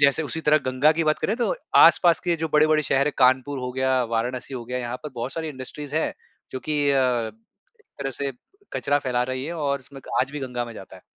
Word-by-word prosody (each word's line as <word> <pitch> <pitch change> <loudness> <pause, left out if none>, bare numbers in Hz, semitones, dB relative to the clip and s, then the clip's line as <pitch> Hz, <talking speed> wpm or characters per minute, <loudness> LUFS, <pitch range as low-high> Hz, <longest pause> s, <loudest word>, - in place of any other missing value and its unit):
जैसे 140 +2 +4
उसी 160 +1 -4
तरह 155 -1 +4
गंगा 130 +4 +4
की 165 +1 -1
बात 155 0 +2
करें, 215 - 0
तो 240 - 0 0.2
आस-पास 170 -3 +6
के 170 -1 +1
जो 160 0 -2
बड़े-बड़े 155 0 +4
शहर 135 0 +1
है, 150 - 0
कानपुर 130 +2 +3
हो 125 0 -4
गया, 130 0 +1
वाराणसी 120 +3 -3
हो 120 -2 -5
गया 125 +1 -3
यहाँ 120 0 -4
पर 150 - -5
बहुत 120 +2 -4
सारी 160 -1 -3
इंडस्ट्रीज़ 145 +2 -6
हैं, 160 - 0 0.4
जो 130 - -4
की 150 -1 0
अ, 140 - +3 0.8
एक - - -28
तरह 135 -1 -3
से 140 +1 -4 0.4
कचरा 145 +1 +1
फैला 125 -3 0
रही 130 0 -3
हैं, 165 - -4
और 140 -4 -1
उसमें 135 +1 -13 0.2
आज 135 - -1
भी 150 - -5
गंगा 125 -2 -3
में 120 -1 -9
जाता 95 - -11
है। - - -17
140 Hz, 235 wpm, -24 LUFS, 130-155 Hz, 0.8 s, आस-पास